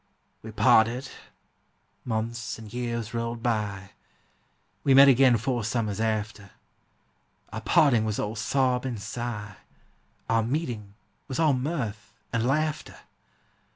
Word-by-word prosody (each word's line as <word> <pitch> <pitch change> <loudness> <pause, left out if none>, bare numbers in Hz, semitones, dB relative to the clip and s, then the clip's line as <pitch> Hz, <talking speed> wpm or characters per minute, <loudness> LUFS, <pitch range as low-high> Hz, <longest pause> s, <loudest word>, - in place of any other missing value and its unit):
We - - -9
parted: 120 +4 +3 1.0
months 115 +1 -3
and 110 -2 -11
years 120 -2 -3
rolled 115 0 -3
by; 105 -4 -2 0.9
We 135 -2 +4
met 140 +1 +9
again 130 -2 +6
four 120 +1 -2
summers 110 -2 -2
after. 110 -2 -2 1.0
Our - - -4
parting 120 -7 +4
was 110 -2 -2
all 105 +2 -3
sob 125 +3 +1
and 125 -5 -4
sigh, 105 -2 -5 0.7
Our 115 0 +2
meeting 115 -6 -3 0.3
was 130 - -4
all 155 -3 +4
mirth 115 -7 -4 0.2
and 115 +1 +1
laughter! 155 +2 -1
115 Hz, 120 wpm, -26 LUFS, 110-130 Hz, 1.0 s, met